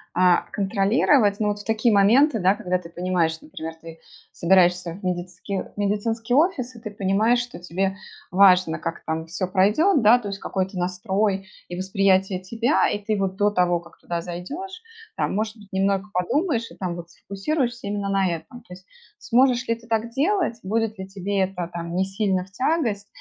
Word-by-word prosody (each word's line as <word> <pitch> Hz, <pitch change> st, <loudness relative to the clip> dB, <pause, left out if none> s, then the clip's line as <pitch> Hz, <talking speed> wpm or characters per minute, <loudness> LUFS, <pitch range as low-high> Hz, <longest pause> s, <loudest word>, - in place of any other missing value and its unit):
а, 180 Hz, 0 st, +4 dB
контролировать? 205 Hz, +2 st, +2 dB
Ну 215 Hz, -, +1 dB
вот, 205 Hz, 0 st, -1 dB
в -, -, -15 dB
такие 225 Hz, +1 st, +2 dB
моменты, 230 Hz, +7 st, +5 dB
да, 190 Hz, +1 st, +4 dB
когда 180 Hz, -3 st, -1 dB
ты 180 Hz, -, -10 dB
понимаешь, 170 Hz, -2 st, -1 dB
например, 160 Hz, +1 st, -7 dB
ты 165 Hz, 0 st, -10 dB, 0.3 s
собираешься 180 Hz, -1 st, +3 dB
в 195 Hz, +4 st, -13 dB
медицики 180 Hz, +2 st, -3 dB
в -, -, -9 dB
медицинский 225 Hz, +4 st, 0 dB
офис 280 Hz, -6 st, +1 dB
и -, -, -11 dB
ты 215 Hz, -2 st, -7 dB
понимаешь, 205 Hz, +4 st, +2 dB
что 240 Hz, 0 st, -6 dB
тебе 190 Hz, +3 st, -2 dB, 0.3 s
важно, 185 Hz, -3 st, +5 dB
как 165 Hz, 0 st, -5 dB
там 160 Hz, 0 st, -2 dB
все 180 Hz, +3 st, -3 dB
пройдет, 210 Hz, -, +3 dB
да, 225 Hz, +4 st, +7 dB
то 220 Hz, -, -7 dB
есть 200 Hz, 0 st, -5 dB
какой-то 190 Hz, 0 st, -3 dB
настрой 190 Hz, +2 st, -1 dB, 0.2 s
и 175 Hz, -, -6 dB
восприятие 190 Hz, 0 st, +1 dB
тебя. 230 Hz, +9 st, +1 dB
И 205 Hz, -, -2 dB
ты 210 Hz, +1 st, -2 dB
вот 190 Hz, -1 st, -2 dB
до 205 Hz, +1 st, +3 dB
того, 180 Hz, -3 st, +2 dB
как 170 Hz, 0 st, -17 dB
туда 170 Hz, -1 st, -4 dB
зайдешь, 290 Hz, -, -7 dB, 0.3 s
там, -, -, 0 dB
может 215 Hz, +2 st, -2 dB
быть, 205 Hz, -2 st, -16 dB
немного 195 Hz, +1 st, +1 dB
подумаешь 235 Hz, -, 0 dB
и, -, -, -14 dB
там 180 Hz, -3 st, -4 dB
вот, 170 Hz, -1 st, -9 dB
сфокусируешься 240 Hz, -, -3 dB
именно 200 Hz, -1 st, -2 dB
на 195 Hz, -1 st, +2 dB
этом. 170 Hz, +9 st, -6 dB
То 200 Hz, -, -13 dB
есть 185 Hz, +1 st, -14 dB, 0.3 s
сможешь 250 Hz, -, +2 dB
ли 230 Hz, -, +2 dB
ты 230 Hz, 0 st, -11 dB
так 225 Hz, 0 st, -1 dB
делать? 300 Hz, -, 0 dB
Будет 220 Hz, +1 st, -1 dB
ли 190 Hz, -, -6 dB
тебе 195 Hz, +1 st, -3 dB
это 185 Hz, -2 st, -1 dB
там 170 Hz, 0 st, -5 dB
не 190 Hz, +1 st, +2 dB
сильно 195 Hz, -1 st, -1 dB
в 190 Hz, -, -23 dB
тягость, 235 Hz, -5 st, -1 dB
195 Hz, 190 wpm, -23 LUFS, 180-225 Hz, 0.3 s, да